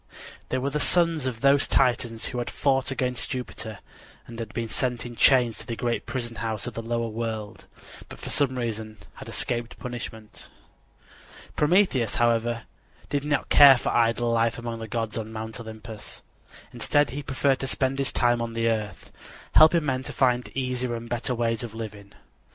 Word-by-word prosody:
They 130 - 0
were 135 +2 -1
the 150 - -1
sons 165 -3 +2
of 115 -3 -4
those 140 +1 +5
Titans 120 -3 +1
who 125 - -4
had 120 - -3
fought 135 -1 +1
against 125 -3 -2
Jupiter 115 -5 -5 0.5
and 115 -2 -7
been 115 -1 -3
sent 125 +1 -2
in 120 -1 -7
chains 125 -3 +4
to 115 - -9
the 115 - -3
great 120 0 -2
prison 120 -3 -4
house 110 -2 -3
of 120 - -5
the 115 - -4
lower 115 0 -1
world, 110 -2 -5 0.4
but - - -10
for - - -6
some 130 -3 +1
reason 110 -2 -4 0.2
had - - -9
escaped 120 -1 -2
punishment. 115 -3 -8 1.1
Prometheus, 150 - +3
however, 120 0 +1 0.5
did 140 -1 -1
not 145 -1 -1
care 140 -3 +9
for - - -2
idle 120 0 +2
life 115 0 +2
among 115 -1 -5
the 110 - -6
gods 115 0 -2
on 110 0 -6
Mount 110 +2 -6
Olympus. 110 -1 -9 0.5
Instead 145 -4 +2
he 145 +3 -4
preferred 135 0 +1
to 135 - -3
spend 135 0 0
his 135 - +1
time 120 -1 +2
on 115 -1 -3
the 115 0 0
earth, 110 -2 -2 0.4
helping 160 0 +6
men 130 -2 0
to - - -7
find 125 -2 +1
easier 125 -2 -1
and 115 0 -7
better 120 +1 -1
ways 115 -1 0
of 115 -3 -7
living. 105 -3 -8
120 Hz, 180 wpm, -26 LUFS, 115-130 Hz, 1.1 s, care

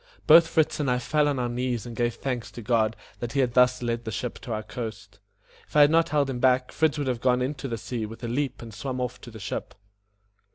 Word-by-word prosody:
Both 165 +2 +8
Fritz 160 -2 +1
and 145 -3 0
I 125 - +2
fell 150 +4 +1
on 145 -2 0
our 125 -1 0
knees 120 -2 -2
and 120 -1 -7
gave 120 0 0
thanks 125 -4 -3
to 120 - -8
God 110 0 +2 0.2
that 120 +1 -4
He 140 - 0
had 125 -3 +2
thus 125 0 +4
led 120 0 -1
the 110 - -4
ship 125 +3 -4
to 120 - -8
our 110 -1 -2
coast. 105 -3 -7 0.5
If - - -20
I 150 - +7
had 145 +1 +7
not 165 0 +3
held 145 -2 +2
him 130 -2 -3
back, 125 0 +3
Fritz 160 -2 +1
would 145 - -1
have 125 -3 -2
gone 125 -1 +2
into 135 +1 -3
the 115 -3 -3
sea 110 0 -4
with 115 +3 -11
a - - -2
leap 130 +1 -2
and 115 -2 -10
swum 130 +5 -4
off 125 -1 -4
to - - -10
the 110 - -10
ship. 100 -1 -5
125 Hz, 260 wpm, -26 LUFS, 115-135 Hz, 0.5 s, Both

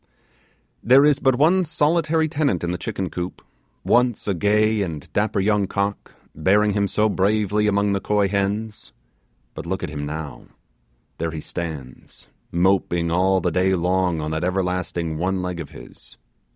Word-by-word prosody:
There 135 +4 +6
is 145 -2 +3
but 130 -3 +3
one 170 +8 +3
solitary 160 0 +1
tenant 145 - 0
in 85 - -1
the 90 - -3
chicken 95 -3 -4
coop, 90 +1 -5 0.4
once 120 -3 +2
a 100 - +1
gay 105 +3 +2
and 80 -7 -4
dapper 105 0 0
young 100 0 +1
cock, 100 +1 -3 0.2
bearing 105 +7 +2
him 100 0 +1
so 105 +2 +1
bravely 105 +1 +1
among 100 0 +2
the 100 - 0
coy 105 -1 +1
hens. 105 +2 -3 0.6
But - - -8
look 95 +1 -3
at 85 - -4
him 75 -1 -4
now; 75 -1 -7 0.7
there 85 +1 -1
he 80 -1 -6
stands, 75 -6 -7 0.2
moping 85 -2 +1
all 95 +2 +2
the 90 - 0
day 95 +2 +2
long 90 -1 0
on 75 +1 -3
that 80 +2 -2
everlasting 90 -3 -2
one 95 +1 -1
leg 90 -1 -4
of 85 - -6
his. - - -12
95 Hz, 165 wpm, -22 LUFS, 85-105 Hz, 0.7 s, There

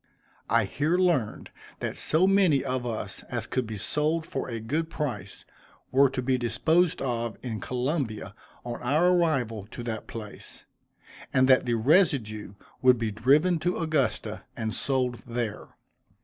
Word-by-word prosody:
I 115 -1 +3
here 150 - 0
learned, 170 - +1 0.3
that - - -3
so 160 +4 +3
many 190 -8 +4
of 125 -1 -2
us 115 -2 -4
as - - -2
could 130 -3 -2
be 110 -1 -5
sold 150 +9 0
for 135 -4 -4
a 115 -2 -3
good 155 +9 -2
price, 110 - -4 0.5
were 135 +1 +5
to 130 -1 -3
be 130 0 +1
disposed 160 +9 +2
of 120 -3 -2
in 115 -4 -4
Columbia, 125 - -2 0.3
on 120 -1 -5
our 150 +8 +3
arrival 125 - +1
at 120 - -7
that 110 -2 -4
place, 110 -2 -8 0.7
and 130 -1 +4
that 130 -1 +5
the 120 - +2
residue 115 - +2 0.3
would 125 -1 +6
be 115 -2 -1
driven 145 - +3
to 175 +3 0
Augusta 155 -5 -1 0.2
and 110 -1 -2
sold 125 -2 -1
there. 115 -3 -3
130 Hz, 150 wpm, -27 LUFS, 115-155 Hz, 0.7 s, would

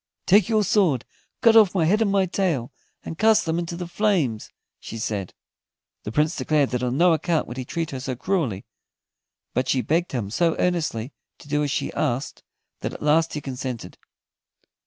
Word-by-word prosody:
"Take 195 +1 +5
your 215 -2 +3
sword, 175 - +2 0.4
cut 230 -1 +6
off 210 -4 +6
my 170 -4 +3
head 210 +7 +2
and 220 - +3
my 195 -1 +3
tail, 170 -10 -1 0.3
and 160 - -7
cast 220 0 +4
them 165 +1 0
into 170 0 -4
the 175 +1 -5
flames," 170 - 0 0.3
she 115 - -8
said. 105 -4 -4 0.7
The 105 - -4
Prince 150 +6 +1
declared 150 -3 +1
that 125 -1 -1
on 125 +1 -1
no 175 +1 +5
account 160 +1 0
would 120 - -8
he 130 - -4
treat 165 +4 -3
her 135 - -5
so 130 0 -4
cruelly; 130 - -1 0.9
but 130 +1 -1
she 130 - +2
begged 170 +3 0
him 105 -6 -3
so 165 +7 +1
earnestly 150 -9 -1 0.2
to - - -16
do 150 0 0
as 145 - 0
she - - -2
asked 120 +4 -2 0.4
that - - -4
at - - -8
last 160 +2 +3
he 150 - -3
consented. 130 -3 -6
155 Hz, 190 wpm, -24 LUFS, 125-180 Hz, 0.9 s, cut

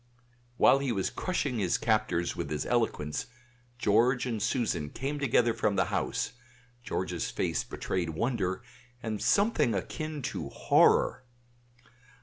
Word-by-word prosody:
While 135 - +6
he 140 -2 -1
was 95 -4 -1
crushing 145 -10 -1
his 95 -4 +1
captors 110 -6 0
with - - -4
his 75 -1 -2
eloquence, 110 -11 -1 0.5
George 120 +3 +3
and 115 -4 -2
Susan 105 - 0
came 140 - -4
together 120 -3 +3
from 105 -2 0
the 95 - +2
house; - - -1 0.5
George's 90 -7 -3
face - - -1
betrayed 90 -3 -3
wonder 95 +2 -1 0.4
and 110 -2 -3
something 150 - +3
akin 155 +4 -4
to - - -4
horror. - - +3
115 Hz, 130 wpm, -29 LUFS, 95-130 Hz, 0.5 s, While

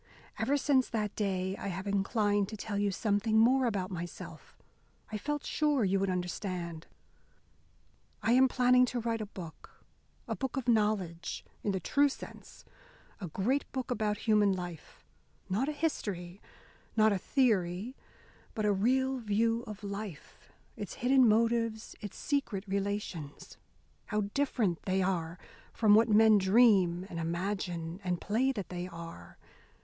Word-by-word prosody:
"Ever 285 +2 +2
since 265 -2 +2
that 210 -3 -2
day 190 -2 -1
I - - -5
have 190 0 -4
inclined 205 0 +1
to 215 - -7
tell 205 0 -3
you 205 0 +2
something 210 +2 +1
more 250 +3 +5
about 195 -4 -2
myself. 175 -1 -8 0.5
I 215 - -3
felt 295 +5 -3
sure 295 -5 +1
you 195 0 +2
would 195 0 0
understand. 180 -2 -4 1.4
I 225 - +2
am 260 +2 +6
planning 250 0 +4
to 245 - -2
write 230 -1 -2
a 215 - -4
book 175 -5 -11 0.4
a - - -2
book 265 0 -4
of 260 -2 -3
knowledge, 210 -7 0 0.2
in 205 - 0
the 190 - -1
true 285 - +3
sense - - -11 0.5
a 190 - -5
great 230 - -1
book 260 -1 -4
about 215 -3 0
human 210 -3 +3
life. 175 -3 -8 0.4
Not 225 +10 0
a - - 0
history, 200 - -3 0.6
not 215 -1 +5
a 195 - -1
theory, 215 -2 +1 0.6
but 215 - -1
a 205 - +3
real 260 +6 +1
view 225 +1 +1
of 210 -1 -8
life, 200 -5 -8 0.2
its - - -6
hidden 260 0 +4
motives, 230 0 +1
its 205 - -7
secret 275 -9 -1
relations. 195 -6 -4 0.5
How 210 -2 0
different 235 - 0
they 190 0 +1
are 175 -2 -1 0.3
from 215 -2 +4
what 225 +2 +5
men 215 0 +6
dream 190 -4 +4
and 170 -4 -6
imagine 170 0 -3
and 180 -2 -1
play 240 +6 +1
that 205 -8 -5
they 180 0 -4
are! 165 - -10
205 Hz, 150 wpm, -31 LUFS, 185-235 Hz, 1.4 s, am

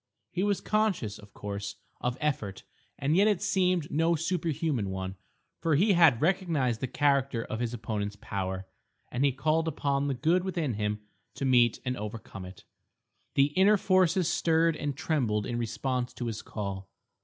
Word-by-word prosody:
He 180 - -2
was 200 -1 +1
conscious, 210 - 0
of 105 -1 -15
course, 100 0 -5 0.2
of 125 +1 -2
effort, 110 -11 -2 0.3
and 145 +3 +1
yet 200 +3 +5
it 205 -4 +2
seemed 180 -4 +1
no 165 +3 +2
superhuman 160 - -1
one, 95 0 -4 0.5
for 165 -3 +2
he 195 +7 +4
had 165 -9 +6
recognised 160 - +1
the 130 - -1
character 140 -3 +1
of 110 - -4
his 120 -1 -1
opponent's 105 -3 -3
power, 95 -3 -4 0.5
and 125 - 0
he 140 - +4
called 155 +5 +1
upon 140 -2 0
the 140 - 0
good 165 +7 +2
within 170 -8 -1
him 105 0 -2 0.3
to 135 - -3
meet 120 -3 +4
and 125 0 -1
overcome 105 -3 -7
it. 90 0 -11 0.7
The 140 +1 +3
inner 200 +3 +6
forces 185 -2 +3
stirred 165 0 +2
and 145 -3 -3
trembled 115 -11 0
in 120 0 -2
response 125 +2 -2
to 120 - -4
his 115 -2 -3
call. 100 -2 -5
135 Hz, 165 wpm, -29 LUFS, 110-165 Hz, 0.7 s, had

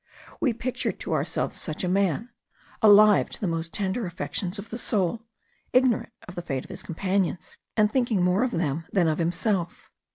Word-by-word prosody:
We 260 - +2
pictured 240 +2 -3
to - - -2
ourselves - - -1
such 155 0 -4
a - - 0
man, 195 - +1 0.5
alive 210 -1 +7
to - - -7
the - - -2
most 165 -1 -2
tender 200 +3 -1
affections 180 +2 -4
of 200 +2 -9
the 235 - -4
soul, 220 +1 -1 0.5
ignorant 255 -3 +3 0.2
of 180 - -8
the 175 - -5
fate 135 -6 -3
of - - -12
his - - -7
companions, 185 +1 -2 0.2
and 210 -1 +4
thinking 235 -7 +1
more 180 +5 +3
of 255 - +1
them 165 - -1
than 180 -4 +3
of 155 +1 0
himself. 175 +1 -1
195 Hz, 185 wpm, -26 LUFS, 170-220 Hz, 0.5 s, alive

